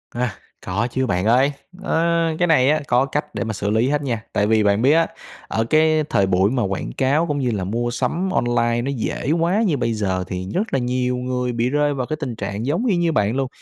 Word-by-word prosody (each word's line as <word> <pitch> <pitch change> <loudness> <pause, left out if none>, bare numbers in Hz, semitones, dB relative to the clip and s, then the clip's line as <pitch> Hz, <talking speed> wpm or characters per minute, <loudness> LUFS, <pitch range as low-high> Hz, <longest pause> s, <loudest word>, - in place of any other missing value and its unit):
À, 120 -3 -1 0.3
có 105 +6 -1
chứ 130 +1 0
bạn 90 -2 0
ơi, 130 +5 +4 0.3
ơ, 170 -1 +1
cái 175 - +3
này 140 -5 +4
á 155 +1 +3
có 125 +2 +3
cách 150 +2 -4
để - - -1
mà 110 -1 -3
xử 100 0 -3
lý 110 +4 +2
hết 145 0 0
nha. 120 -6 -3
Tại 105 - +1
vì 110 0 +3
bạn 100 +1 +2
biết 135 +4 +4
á, 165 +1 +3 0.4
ở 110 - 0
cái 155 0 +3
thời 100 - +2
buổi 95 +2 +2
mà 125 -2 0
quảng 95 -10 -3
cáo 145 +5 +2
cũng 145 -2 -1
như 125 -3 0
là 100 -4 -2
mua 120 +5 -2
sắm 135 +10 -1
online 120 -4 +1
nó 135 +3 -2
dễ 125 +3 -2
quá 170 +6 +2
như 155 -6 +1
bây 115 -2 0
giờ, 95 -4 -1
thì 95 0 -5
rất 210 +5 -2
là 135 - +2
nhiều 125 0 -1
người 125 0 -2
bị 120 +1 0
rơi 145 +1 +1
vào 130 -3 -2
cái 155 - -3
tình 130 -6 -4
trạng 100 +1 -4
giống 165 - 0
y 215 -7 +2
như 170 -1 +1
bạn 105 -4 +1
luôn. 135 0 0
125 Hz, 250 wpm, -21 LUFS, 110-150 Hz, 0.4 s, ơi